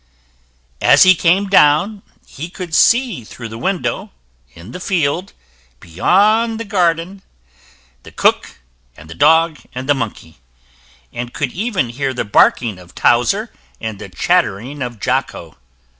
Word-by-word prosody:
] - - -40
As - - +6
he 185 - +7
came 185 +3 +2
down, 190 +3 +3 0.2
he 160 +5 -8
could 180 -2 -8
see 235 - +3
through 115 +1 -10
the 110 - -8
window 190 +5 -2 0.5
in 85 +7 -12
the 180 - -8
field 175 0 -1 0.5
beyond 210 - +1
the 230 - -5
garden 180 -1 -1 0.8
the - - -14
cook, - - 0 0.4
and 80 +1 -13
the - - -6
dog, 160 - +3 0.2
and 130 +1 -5
the 145 - +4
monkey, 110 - -6 0.7
and 120 0 -6
could 135 -4 -2
even 195 - -2
hear 135 +2 -3
the 125 - -2
barking 105 0 +2
of 90 -1 -17
Towser 195 - +1 0.3
and 110 -3 -6
the 100 - -9
chattering 135 - -1
of 120 -3 -5
Jocko. 125 - -3
145 Hz, 145 wpm, -17 LUFS, 115-185 Hz, 0.8 s, he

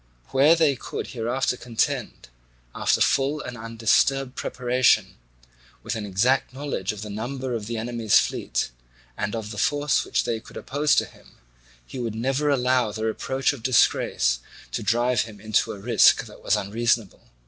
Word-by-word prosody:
Where 145 +5 +5
they 155 -4 +3
could - - -6
hereafter 125 +2 -1
contend, 115 - -2 0.4
after - - +1
full 140 +3 +2
and 125 - -6
undisturbed 115 +4 +1
preparation, 120 -6 +1 0.7
with - - -3
an 105 -2 -4
exact 125 +7 +1
knowledge 135 -9 -3
of 105 0 -7
the 105 - -7
number 125 +4 -4
of 110 -3 -4
the 115 0 -3
enemy's 115 -2 +2
fleet - - -1 0.4
and 105 - -3
of 110 -2 -5
the 105 - -6
force 145 0 +1
which - - 0
they 115 -1 -2
could - - -13
oppose 145 +2 +1
to - - +2
him, - - -19 0.5
he 125 - -8
would 115 -3 -3
never 135 +6 0
allow 125 -4 +2
the 110 +1 -4
reproach 130 +5 0
of 135 - -9
disgrace 85 - +2 0.3
to - - -3
drive 120 +2 +2
him 110 -2 -8
into 110 +1 0
a - - -7
risk 110 +3 +4
that - - -14
was - - +2
unreasonable. 115 0 -1
120 Hz, 165 wpm, -24 LUFS, 110-130 Hz, 0.7 s, Where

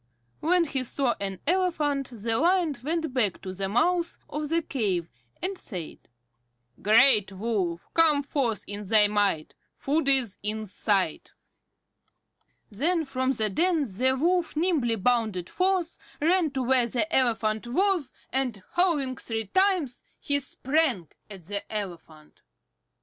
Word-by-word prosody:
When 355 +2 +3
he 275 -5 -1
saw 255 0 0
an 195 -2 -4
elephant 305 -6 0
the 225 0 -1
Lion 345 -2 +2
went 320 -1 -2
back 220 -8 +1
to 185 - -5
the 195 +1 -3
mouth 335 - +1
of 300 0 -4
the 330 +1 +1
cave, 195 - -2 0.3
and 385 +2 -1
said: 180 - -7 0.8
"Great 215 -1 +5
Wolf, 190 -4 -2
come 310 -3 +4
forth 260 -6 -1
in 205 0 -6
thy 210 0 +5
might. 205 -6 0 0.2
Food 285 +1 0
is 255 -7 +2
in 215 +1 -3
sight." 195 -4 -1 1.4
Then 320 - 0
from 260 -1 0
the 215 -4 -1
den 335 - +2
the 255 +3 0
Wolf 340 +5 +1
nimbly 305 -8 +1
bounded 220 -5 0
forth, 370 -2 0 0.2
ran 335 +1 +3
to 265 -1 -1
where 250 -1 +3
the 235 -2 0
elephant 225 -3 +1
was, 355 0 +1 0.2
and, 250 -7 -1
howling 300 -8 +1
three 225 -1 -4
times, 360 - +1 0.2
he 285 0 +1
sprang 265 - 0 0.2
at 195 -4 -10
the 200 +4 -4
elephant. 170 -7 -7
255 Hz, 135 wpm, -26 LUFS, 210-320 Hz, 1.4 s, Great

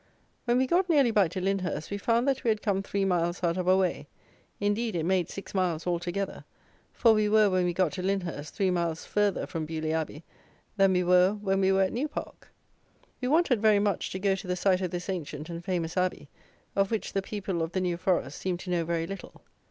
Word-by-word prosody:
When 240 0 +2
we 260 - +3
got 355 +6 +2
nearly 280 -7 +4
back 205 -6 +3
to 185 - -4
Lyndhurst, 190 -3 -2
we 200 - -2
found 235 +4 +1
that 270 -1 0
we 235 - +1
had 215 -1 0
come 195 -3 +1
three 195 0 -1
miles 175 -1 0
out 170 -1 +2
of 180 -1 -2
our 185 - +6
way; 185 -2 0 0.5
indeed, 205 +1 0
it 160 -2 -1
made 185 -1 +1
six 195 - -8
miles 180 -4 0
altogether; 175 +2 -2 0.5
for 230 -2 +4
we 215 -1 +2
were, 210 -1 +5
when 185 -1 +2
we 175 - 0
got 185 -4 +2
to 185 - -5
Lyndhurst, 180 -6 -3
three 190 -2 +1
miles 170 -2 -1
further 205 -1 0
from 160 -2 -4
Beaulieu 155 0 -2
Abbey 160 -1 -3 0.5
than 195 -2 +4
we 180 0 +2
were 180 +2 +5
when 195 -2 -1
we 190 0 +3
were 195 0 +4
at 185 - -1
New 265 +6 -1
Park. 300 - -8 0.7
We 250 - -1
wanted, 280 -6 +3
very 215 -2 +5
much, 200 -2 0
to - - -4
go 195 0 +1
to 190 0 -5
the 180 - 0
site 185 0 +2
of 185 - -1
this 175 +1 -5
ancient 160 -4 -5
and 170 0 -6
famous 175 -3 -2
Abbey, 185 -1 -1 0.5
of 195 0 +2
which 220 -2 -3
the 195 - +1
people 190 -3 -3
of 165 +1 -3
the 190 - 0
New 175 -2 -1
Forest 175 -6 -1
seemed 180 -2 -2
to 180 - -6
know 175 -1 +1
very 165 0 -1
little. 195 +2 -9
190 Hz, 230 wpm, -28 LUFS, 175-205 Hz, 0.7 s, our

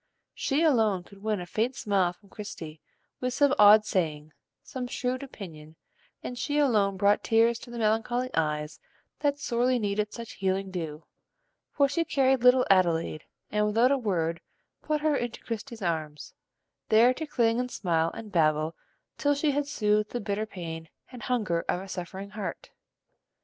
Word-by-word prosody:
She 290 +3 0
alone 220 - +3
could 195 +2 -17
win 215 -1 -1
a 180 - -5
faint 225 +8 -1
smile 195 -4 +1
from 195 +3 -21
Christie 160 -7 -8 0.4
with 250 0 -2
some 285 -1 +4
odd 210 +1 +8
saying, 155 -6 -2 0.3
some 250 -2 -5
shrewd 250 +1 -2
opinion, 160 - -10 0.5
and 245 -1 -5
she 290 +4 -1
alone 210 -9 +2
brought 205 +1 +3
tears 230 +1 +3
to - - -12
the 240 - -7
melancholy 230 +3 0
eyes 150 -1 -1 0.4
that 285 -1 +1
sorely 250 -2 +1
needed 210 -1 -1
such 230 -1 -8
healing 190 0 -2
dew; 160 -4 -5 0.7
for 280 -1 +3
she 335 +4 0
carried 265 -4 +2
little 250 0 +6
Adelaide, 165 -4 +2 0.3
and 210 0 +2
without 230 +5 +3
a 280 - +3
word 170 -7 -1 0.4
put 305 -1 -1
her 305 -1 +2
into 240 -3 -4
Christie's 230 -1 -6
arms, 155 -3 -3 0.6
there 230 +3 +6
to 315 +4 -5
cling 230 -4 +2
and 250 0 -2
smile 165 -7 0
and 215 -2 -8
babble 155 -2 +2 0.4
till 290 0 +2
she 290 +1 +1
had 285 0 -1
soothed 210 -4 +1
the 245 - -3
bitter 210 0 -2
pain 165 -5 -7 0.2
and 250 -2 -10
hunger 210 -9 0
of - - +1
a 190 - -8
suffering 190 +2 -6
heart. 210 0 -6
210 Hz, 165 wpm, -28 LUFS, 180-250 Hz, 0.7 s, odd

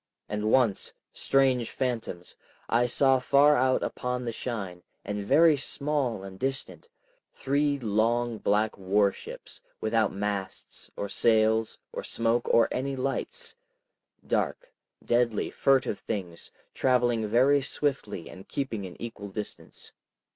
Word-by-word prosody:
And 105 +1 -1
once—strange 125 +2 +1
phantoms!—I 120 0 -3
saw 135 +1 +3
far 140 +3 +5
out 130 -1 +2
upon 125 0 -3
the 115 - -1
shine, 100 -7 -5 0.2
and 105 0 -3
very 160 +9 +5
small 140 -6 -1
and 95 -1 -9
distant, 135 - -3 0.5
three 140 +1 +1
long 115 0 0
black 105 +1 +1
warships, 100 +1 -1 0.2
without 110 -1 +1
masts, 100 -1 -4
or 100 - -2
sails, 110 +1 +2 0.2
or - - -4
smoke, 115 +1 0
or 115 - +5
any 135 +2 -2
lights, 135 - -2 0.7
dark, - - -2 0.3
deadly, 120 -3 +1
furtive 135 -6 +2
things, 90 -5 -5 0.2
traveling 120 -4 +2
very 130 +6 +4
swiftly 135 - -2
and 95 - -12
keeping 115 -8 -3
an 90 - -13
equal 115 -3 -7
distance. 105 +2 -8
120 Hz, 115 wpm, -28 LUFS, 105-135 Hz, 0.7 s, far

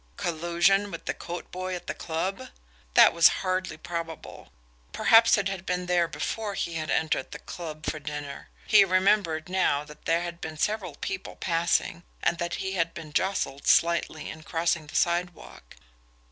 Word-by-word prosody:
Collusion 175 +4 +2
with - - -8
the - - -1
coat 175 +1 -7
boy 185 0 -4
at 175 - -8
the - - -3
club? 175 +4 -3 0.5
That - - +8
was 170 0 +7 0.2
hardly 185 -3 -1
probable. 165 0 -7 0.4
Perhaps 225 0 +6
it 200 -1 0
had 195 -2 -4
been 180 -1 -2
there 175 -1 +2
before 210 +4 -3
he 170 - -2
had 155 -2 -3
entered 155 -4 0
the - - -7
club 155 -3 -8
for 155 - -2
dinner 145 -1 -7 0.2
he 210 -2 +7
remembered, 185 -4 +2
now, 180 -6 +1
that 150 0 -15
there 170 +1 +2
had 170 -1 -6
been 160 -1 -6
several 210 +4 -1
people 390 -1 -5
passing, 170 -1 0 0.2
and 170 - +1
that 170 0 -2
he 190 - -3
had 165 -3 -1
been 155 -2 -9
jostled 190 -8 -1
slightly 170 -2 +2
in 160 - -10
crossing 165 0 -1
the - - -11
sidewalk. 175 - -2
170 Hz, 170 wpm, -27 LUFS, 160-185 Hz, 0.5 s, That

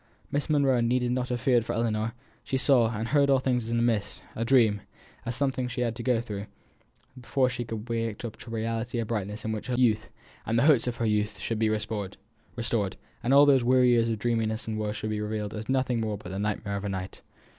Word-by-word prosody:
Miss 145 +2 -1
Monro 140 -5 +3
need 125 +2 +1
not 125 0 -1
have 120 -1 -2
feared 120 -3 +3
for - - -3
Ellinor: 115 -1 -1 0.3
she 135 - -1
saw 130 -4 +4
and 110 +1 -3
heard 140 -1 +3
all 135 - +5
things 125 -3 0
as - - -6
in 115 - 0
a 115 - +2
mist 115 -4 -1
a 115 - -1
dream; 115 -5 +4 0.5
as 120 - 0
something 135 -2 0
she 125 0 -4
had 115 -2 0
to 120 - -6
go 125 -1 +2
through, 105 -3 -5 0.7
before 130 +1 +1
she 125 -1 -3
could 115 -1 -6
waken 115 -1 -2
up 110 - -9
to - - -10
a - - -8
reality 115 +1 -2
of 115 -2 -1
brightness 105 -1 -3
in 110 - -1
which 110 -1 -4
her 125 - -1
youth, 110 -4 +2 0.3
and 115 - 0
the 120 - +4
hopes 140 -6 +5
of 120 - -1
her 115 - -2
youth, 105 -1 0
should 105 +3 -3
be 110 -1 +2
restored, 105 -2 -3 1.0
and 120 +2 0
all 140 +1 +8
these 135 -3 +5
weary 125 0 +4
years 115 -1 +3
of 110 - -1
dreaminess 110 0 -1
and 110 -1 -2
woe 105 -1 -1
should 105 +1 -4
be 105 0 -2
revealed 105 -1 -3
as 110 +2 -6
nothing 130 -3 +1
but 110 -2 -3
the 95 +2 -5
nightmare 100 -1 -2
of 100 - -5
a 100 - -2
night. 95 0 -5
115 Hz, 240 wpm, -27 LUFS, 110-125 Hz, 1.0 s, all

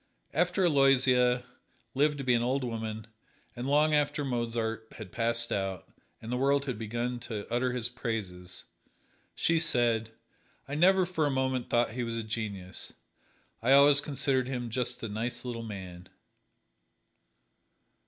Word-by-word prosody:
After 180 +4 +2
Aloysia 130 -4 +4 0.5
lived 145 +2 +2
to 140 - -4
be 125 -1 +2
an 120 - +2
old 130 +3 0
woman, 110 -2 -4 0.5
and 120 +2 -4
long 150 +2 +3
after 145 0 +1
Mozart 115 -3 -2
had 105 -5 -9
passed 115 0 +2
out, 95 -3 -2 0.3
and 115 - -8
the 125 - 0
world 140 +2 +2
had 125 -5 -4
begun 120 +2 -3
to 110 -3 -6
utter 125 +1 +1
his 120 -2 -1
praises, 100 -8 -5 0.7
she 165 0 +2
said: 120 -8 +3 0.6
"I 140 - -6
never 185 +4 +4
for 160 -4 0
a - - +1
moment 130 -2 -1
thought 120 -1 +2
he 125 +2 -4
was 115 -1 -3
a 115 - -3
genius 105 -4 -5 0.7
I 125 +4 +4
always 140 +1 +7
considered 135 -3 0
him 125 -3 -4
just 125 0 -3
a - - -2
nice 115 +5 -4
little 120 -2 -4
man." 95 -5 -8
125 Hz, 150 wpm, -29 LUFS, 115-135 Hz, 0.7 s, always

